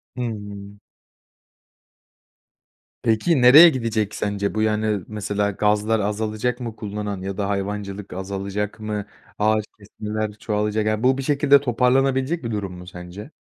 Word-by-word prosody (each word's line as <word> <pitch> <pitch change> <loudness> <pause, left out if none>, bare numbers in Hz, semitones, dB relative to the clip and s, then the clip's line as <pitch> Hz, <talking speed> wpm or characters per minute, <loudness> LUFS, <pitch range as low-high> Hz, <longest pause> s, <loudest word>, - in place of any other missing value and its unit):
Hımm. 105 -4 -6 2.2
Peki, 120 +6 +2
nereye 145 +8 +10
gidecek 115 -7 -2
sence 100 0 -2
bu, 110 - +1
yani? 105 -3 0
Mesela 105 -1 -1
gazlar 105 +2 +1
azalacak 110 +4 -2
mı 115 -3 -5
kullanan 105 -2 -5
ya 95 +1 -5
da 100 -1 -1
hayvancılık 100 0 -4
azalacak 100 +2 -4
mı? 105 -1 -4 0.3
Ağaç 110 0 +2
kesmeler 105 +1 -4
çoğalacak... 105 0 -1
Yani, 110 +2 0
bu 130 +1 +4
bir 135 - -3
şekilde 140 0 +4
toparlanabilecek 130 +4 +1
bir 115 - -3
durum 100 -3 -3
mu 90 0 -11
sence? 90 - -9
105 Hz, 130 wpm, -22 LUFS, 100-115 Hz, 2.2 s, nereye